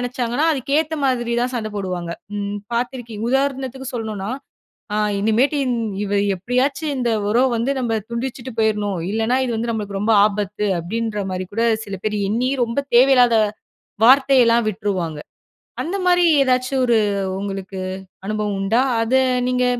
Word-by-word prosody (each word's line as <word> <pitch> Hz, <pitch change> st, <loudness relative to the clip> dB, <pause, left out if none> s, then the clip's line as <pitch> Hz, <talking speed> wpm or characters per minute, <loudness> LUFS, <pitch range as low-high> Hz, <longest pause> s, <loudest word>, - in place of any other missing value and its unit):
நினைச்சாங்கன்னா, 245 Hz, +3 st, -1 dB
அதுக்கேத்த 295 Hz, +3 st, 0 dB
மாரி 240 Hz, -3 st, 0 dB
தான் 250 Hz, -, -1 dB
சண்டை 220 Hz, -3 st, -3 dB
போடுவாங்க. 180 Hz, -3 st, -3 dB, 0.3 s
ம் 200 Hz, 0 st, -3 dB, 0.2 s
பார்த்துருக்கீங் 235 Hz, -2 st, -3 dB
உதாரணத்துக்கு 265 Hz, -1 st, -1 dB
சொல்லணும்னா, 215 Hz, -3 st, -4 dB, 0.7 s
அ -, -, 0 dB, 0.2 s
"இனிமேட்டு 230 Hz, +8 st, +2 dB
இன் 250 Hz, -1 st, 0 dB, 0.3 s
இவ 200 Hz, -, -4 dB, 0.2 s
எப்படியாச்சும் 270 Hz, -, -1 dB
இந்த 240 Hz, -2 st, 0 dB, 0.2 s
உறவ 245 Hz, +4 st, +4 dB
வந்து 245 Hz, +5 st, 0 dB
நம்ம 230 Hz, -3 st, 0 dB
துண்டிச்சுட்டு 245 Hz, +1 st, -4 dB
போயிறணும். 210 Hz, -3 st, +1 dB
இல்லனா, 225 Hz, +4 st, +1 dB
இது 240 Hz, -, -2 dB
வந்து 230 Hz, +1 st, -1 dB
நம்மளுக்கு 205 Hz, -3 st, -4 dB
ரொம்ப 215 Hz, +3 st, +2 dB
ஆபத்து." 210 Hz, 0 st, -2 dB
அப்படின்ற 210 Hz, +3 st, -3 dB
மாரி 185 Hz, 0 st, -4 dB
கூட 230 Hz, +2 st, +1 dB, 0.2 s
சில 200 Hz, -2 st, -5 dB
பேர் 210 Hz, -1 st, 0 dB
எண்ணி 245 Hz, +5 st, 0 dB
ரொம்ப 230 Hz, +3 st, -1 dB, 0.2 s
தேவையில்லாத 250 Hz, -2 st, +6 dB, 0.7 s
வார்த்தையெல்லாம் 250 Hz, -3 st, +5 dB
விட்ருவாங்க. 185 Hz, -7 st, -3 dB, 0.6 s
அந்த 350 Hz, +5 st, -3 dB
மாதிரி 355 Hz, -1 st, +4 dB, 0.2 s
ஏதாச்சும் 255 Hz, 0 st, +1 dB
ஒரு 235 Hz, -1 st, +4 dB, 0.4 s
உங்களுக்கு 195 Hz, -1 st, -5 dB, 0.5 s
அனுபவம் 210 Hz, -1 st, -2 dB
உண்டா? 220 Hz, +5 st, +2 dB, 0.2 s
அத 230 Hz, +3 st, -3 dB, 0.4 s
நீங்க 250 Hz, 0 st, +1 dB
230 Hz, 140 wpm, -20 LUFS, 210-255 Hz, 0.7 s, தேவையில்லாத